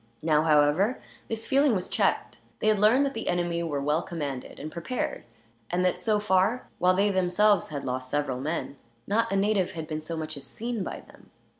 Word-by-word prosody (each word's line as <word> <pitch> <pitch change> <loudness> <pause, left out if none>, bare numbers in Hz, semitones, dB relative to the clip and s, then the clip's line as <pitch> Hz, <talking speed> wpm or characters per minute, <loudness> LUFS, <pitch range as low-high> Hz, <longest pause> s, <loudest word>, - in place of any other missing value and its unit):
Now, 155 -2 +3
however, 155 - +3 0.3
this 225 0 -4
feeling 275 -3 +3
was 185 - -2
checked. - - 0 0.2
They 215 - +1
had 215 -2 +3
learned 235 +7 +5
that 275 - -2
the 225 - -5
enemy 175 -1 0
were 155 -4 -2
well 150 +4 +1
commanded, 145 -7 -5
and 155 - -6
prepared; 175 - -3 0.4
and 180 +1 +1
that 180 - +1
so 215 -2 +1
far, 205 +4 +2
while 180 +1 +4
they 200 +2 +3
themselves 190 +1 +3
had 145 -2 -5
lost 130 0 -3
several 145 -3 -1
men, 145 0 -3 0.3
not 230 +2 +1
a - - +1
native 195 -2 +1
had 160 -3 -5
been 155 -1 -4
so 165 +1 -5
much 155 -1 -4
as 140 - -9
seen 225 - -4
by - - -6
them. - - -19
180 Hz, 200 wpm, -27 LUFS, 155-210 Hz, 0.4 s, learned